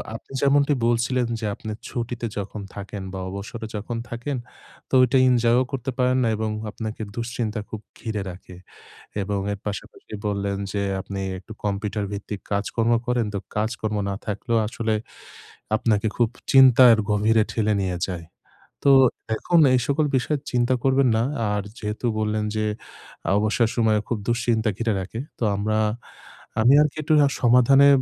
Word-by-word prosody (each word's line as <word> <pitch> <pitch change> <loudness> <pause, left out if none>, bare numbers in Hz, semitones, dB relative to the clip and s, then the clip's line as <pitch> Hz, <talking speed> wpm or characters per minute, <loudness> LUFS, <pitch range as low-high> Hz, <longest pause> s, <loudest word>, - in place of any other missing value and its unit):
আপনি 115 - -11
যেমনটি 140 +1 +4
বলছিলেন 120 +1 +1
যে 110 - -4
আপনি 110 -2 -7 0.2
ছুটিতে 120 0 -4
যখন 100 +1 -5
থাকেন 100 -1 -6
বা 95 - -4
অবসরে 105 +4 -6
যখন 110 +3 -4
থাকেন 120 +3 -3 0.5
তো - - -22
ওইটা 125 +1 +4
এনজয়ও 120 +1 +4
করতে 135 0 -3
পারেন 125 0 +2
না - - +2
এবং 110 0 -1 0.2
আপনাকে 110 +1 -6
দুশ্চিন্তা 115 -2 -3
খুব 110 -1 -6 0.2
ঘিরে 110 -3 -3
রাখে। 90 0 -11 0.7
এবং 100 +1 -2
এর 100 - -5
পাশাপাশি 105 +1 -7
বললেন 100 -1 -1 0.2
যে 100 -1 -1 0.2
আপনি 100 0 -5 0.2
একটু 105 +4 -11
কম্পিউটার 105 +1 -1
ভিত্তিক 100 0 -5
কাজকর্ম 115 +3 0
করেন 120 -3 +1
তো - - 0 0.2
কাজকর্ম 110 0 -1
না - - -2
থাকলেও 115 +3 -1
আসলে 110 0 -1 0.8
আপনাকে 110 -1 +1
খুব 120 -2 +3 0.2
চিন্তার 130 -3 +8
গভীরে 110 +2 +3
ঠেলে 110 -2 +1
নিয়ে 90 -2 -2
যায়। 85 -3 -5 0.6
তো 140 - +6 0.4
এখন 170 +8 +2
এই 125 - +4
সকল 150 +2 +2
বিষয়ে 145 +3 -1
চিন্তা 125 0 +2
করবেন 135 -1 +3
না। 115 - +2 0.3
আর 105 0 0 0.2
যেহেতু 105 +3 -4
বললেন 110 0 0
যে 110 0 0 0.7
অবসর 110 +2 +2
সময় 110 -3 +3
খুব 115 - -1
দুশ্চিন্তা 115 -2 +1
ঘিরে 115 -2 0
রাখে। 100 +5 -6 0.2
তো - - -2
আমরা, 110 +2 0 0.8
আমি 125 +5 +6
আরকি 150 -1 0
একটু 155 - +1
রা 140 - +5
সমাধানে 125 +3 +6
110 Hz, 155 wpm, -24 LUFS, 105-125 Hz, 0.8 s, চিন্তার